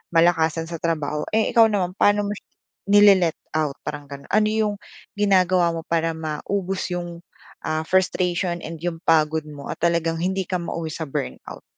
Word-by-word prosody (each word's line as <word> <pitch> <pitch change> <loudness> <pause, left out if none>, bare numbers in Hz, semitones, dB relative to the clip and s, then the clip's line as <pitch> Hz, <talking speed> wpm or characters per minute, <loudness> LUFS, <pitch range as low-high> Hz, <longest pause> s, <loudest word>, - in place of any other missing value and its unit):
malakasan 165 -1 +3
sa 165 -2 -6
trabaho. 150 -3 -1
Eh, 220 - +2
ikaw 230 -2 +6
naman 185 -4 0
paano 205 0 +3
mo 205 - -2
siya 210 - -8 0.4
nile-let-out? 180 -7 +3
Parang 145 -1 -6
gano'n, 140 0 -10
ano 215 +1 +3
'yong 215 -1 0 0.4
ginagawa 185 -4 +3
mo 165 - -4
para 165 0 0
maubos 180 +5 -3
'yong 175 -1 -5 0.5
ah, 155 0 -1
frustration 180 0 0
and 165 0 -7
'yong 170 -1 -3
pagod 160 -1 +2
mo 145 -2 -9
at - - -4
talagang 170 -1 +1
hindi 190 +1 0
ka 185 - -2
mauwi 170 -2 -3
sa 160 - -4
burnout? 65 - -6
170 Hz, 165 wpm, -23 LUFS, 160-190 Hz, 0.5 s, ikaw